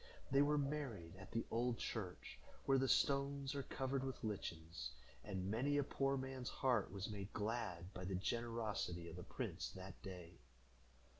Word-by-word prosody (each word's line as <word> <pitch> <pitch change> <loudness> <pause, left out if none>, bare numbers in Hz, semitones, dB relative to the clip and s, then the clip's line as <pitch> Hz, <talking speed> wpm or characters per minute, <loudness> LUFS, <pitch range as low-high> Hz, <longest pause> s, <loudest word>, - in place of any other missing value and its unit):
They 135 +1 +7
were 150 +1 +5
married 135 - -1
at 100 - -9
the 115 - 0
old 120 +1 +2
church, 95 -6 -3 0.3
where 135 -1 +6
the 135 - +3
stones 140 0 +3
are 140 - 0
covered 135 0 0
with 130 -1 -3
lichens, 80 - -3 0.3
and 95 +2 -1
many 140 +6 +3
a 145 - +5
poor 135 0 +2
man's 130 -1 -2
heart 125 -6 +3
was 100 -1 -2
made 100 -1 -4
glad 105 -5 -1
by 90 - -4
the 95 0 0
generosity 105 -4 0
of - - -7
the - - -5
prince - - -2
that 95 0 -8
day. 90 - -7
115 Hz, 165 wpm, -42 LUFS, 95-135 Hz, 0.3 s, They